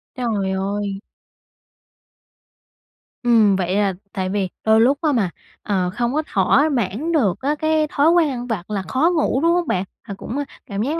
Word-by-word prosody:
Trời 215 -6 -1
ơi! 195 +1 -2 2.2
Ừm. 225 -5 +4
Vậy 185 0 -1
là 200 -2 +2 0.2
tại 185 -1 -2
vì 195 -2 -1 0.2
đôi 220 0 +5
lúc 270 +4 +4
á 310 -3 +2
mà, 220 -8 +1 0.3
ờ, 185 -3 0
không 240 +2 -1
có 310 +2 0
thỏa 245 +10 +3
mãn 250 - -1
được 230 - +1
á 290 +3 0
cái 315 -1 +1
thói 295 +2 +2
quen 340 -3 +4
ăn 245 -2 -5
vặt 210 -6 -4
là 205 -2 -2
khó 270 - +1
ngủ, 280 -3 +1
đúng 335 +1 +3
hông 350 -1 0
bạn? 185 0 0 0.2
À 210 - -8
cũng 250 - -5 0.3
cảm 200 -4 -4
giác 305 +7 -1
230 Hz, 180 wpm, -21 LUFS, 195-290 Hz, 2.2 s, đôi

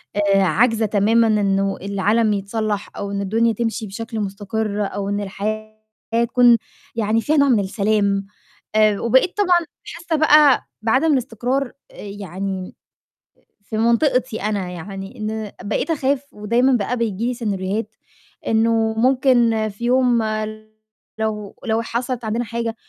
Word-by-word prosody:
آآ، 200 -1 +3
عاجزة 220 +5 +2
تمامًا 220 +3 +3
إنه 195 -2 +1
العالم 205 +3 +1
يتصلّح 205 +1 -2
أو 200 0 -4
إن 200 0 -2
الدنيا 225 +3 +1
تمشي 225 -1 -2
بشكل 225 +3 -6
مُستقِر 205 +1 -3
أو 200 0 -4
إن 205 0 -1
الحياة 215 +2 -4 0.5
تكون 240 -1 +5 0.4
يعني 225 0 +1
فيها 305 +4 +1
نوع 280 -1 +4
من 230 -4 +4
السلام، 200 0 0 0.5
آآ، 215 -2 +4
وبقيت 260 - +2
طبعًا 355 -4 +3 0.2
حاسّة 340 -1 -4
بقى 300 -3 +5 0.2
بعدم 275 +7 +3
الإستقرار 250 +1 -1 0.2
آآ، - - -18
يعني 195 -2 -5
م - - -17 0.9
في 215 +1 -5
منطقتي 235 0 +1
أنا 200 -4 -1
يعني 195 +6 -8
إن 215 -1 -4 0.2
بقيت 260 +9 -1
أخاف 280 -2 0
ودايمًا 235 +5 +2
بقى 240 +2 0
بييجي 225 -1 -2
لي 250 - 0
سيناريوهات 205 -2 -3 0.5
إنه 225 0 +2
ممكن 240 -3 +3
في 210 +4 -7
يوم 245 -2 +3 1.0
لو 210 -2 -3
لو 225 0 +1
حصلت 235 +1 -3
عندنا 230 +3 -1
حاجة 230 0 -3
220 Hz, 135 wpm, -20 LUFS, 205-240 Hz, 1.0 s, تكون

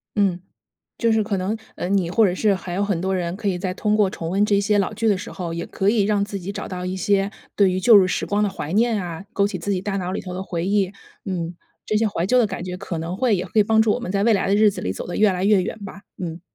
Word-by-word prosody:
嗯 195 -4 +2 0.6
就 230 -1 +1
是 220 -1 +2
可 205 -2 -1
能， 190 +4 -1 0.2
呃， - - -4
你 190 -3 +1
或 220 +5 +3
者 185 - +3
是 200 +2 +2
还 185 -1 -6
有 200 - +1
很 200 -4 0
多 190 +1 -1
人 175 -2 -2
可 205 -1 -2
以 180 - -1
在 185 0 -3
通 210 +1 +1
过 210 -2 +3
重 165 -3 -5
温 200 +3 +2
这 200 -1 +3
些 205 0 +2
老 200 +2 0
剧 225 +1 0
的 200 -3 +2
时 185 - -7
候， 175 -3 -5
也 170 - -4
可 195 +1 +1
以 215 -1 +2
让 205 -1 +1
自 200 -1 -5
己 190 +2 -6
找 - - -6
到 180 -1 -5
一 185 - -3
些 195 +1 +1 0.3
对 200 -2 +5
于 185 0 -1
旧 225 +2 +7
日 185 - +4
时 185 - -1
光 205 +1 0
的 205 - +1
怀 160 -3 -5
念 225 -2 +2
啊， 175 +1 -6
勾 200 - +2
起 200 -2 -2
自 200 +4 -2
己 185 - 0
大 195 0 -2
脑 185 -1 -3
里 - - -2
头 180 - -7
的 180 - -4
回 175 -3 -3
忆。 195 -1 +1 0.3
嗯， 175 -3 -4 0.3
这 215 - 0
些 220 +1 +2
怀 175 -5 -1
旧 250 +6 +3
的 240 - +4
感 190 -3 -5
觉 180 0 -5
可 180 -3 -5
能 170 +3 -4
会 245 0 +2
也 180 -1 -1
会 210 +3 +2
帮 220 +1 +4
助 220 - +2
我 - - -1
们 190 -6 -5
在 200 0 +1
未 230 - +4
来 200 -2 +1
的 195 - +2
日 210 0 +5
子 - - -7
里 90 - -2
走 - - -6
得 175 - -5
越 210 -2 +4
来 185 +1 -2
越 205 -1 +5
远 180 - -3
吧。 200 0 -9 0.2
嗯。 165 0 -5
195 Hz, 335 characters per minute, -22 LUFS, 180-210 Hz, 0.6 s, 旧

